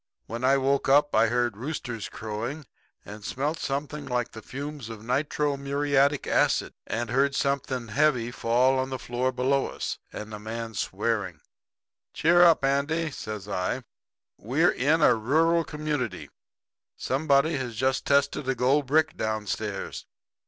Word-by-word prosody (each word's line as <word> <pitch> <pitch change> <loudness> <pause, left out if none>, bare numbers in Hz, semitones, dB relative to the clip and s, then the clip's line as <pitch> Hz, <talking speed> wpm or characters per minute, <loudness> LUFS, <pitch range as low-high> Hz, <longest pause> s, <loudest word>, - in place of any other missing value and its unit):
"When 115 +2 -6
I 135 +2 +4
woke 135 0 +1
up 145 +2 +4
I 115 - +5
heard 120 -1 0
roosters 120 -3 -5
crowing, 115 +8 -5 0.4
and 105 0 -10
smelt 145 +9 -2
something 145 +2 -3
like 125 -1 -1
the 110 - -9
fumes 140 -1 -7
of 110 -2 -8
nitro 145 +3 0
muriatic 140 0 +1
acid, - - +2
and 115 +2 -2
heard 135 +2 +2
something 135 -4 -1
heavy 125 -2 +2
fall 125 +3 +2
on 130 0 -1
the 130 - -3
floor 125 +1 -1
below 130 +2 +1
us, - - -5
and 105 0 -7
a 105 - -6
man 115 +1 -5
swearing. 95 - -2 0.8
"'Cheer 175 +2 +4
up, 170 -5 +6
Andy,' 155 +4 0
says 105 -6 -6
I. 100 +6 -2 0.6
'We're 140 +11 +2
in 150 +6 +2
a - - +7
rural 160 +9 +2
community. 150 - -4 0.7
Somebody 140 +3 +2
has 125 -3 -4
just 130 +3 0
tested 140 0 +1
a 135 - +1
gold 130 +3 +2
brick 155 +3 +2
downstairs. 105 -2 -3
135 Hz, 145 wpm, -27 LUFS, 115-145 Hz, 0.8 s, a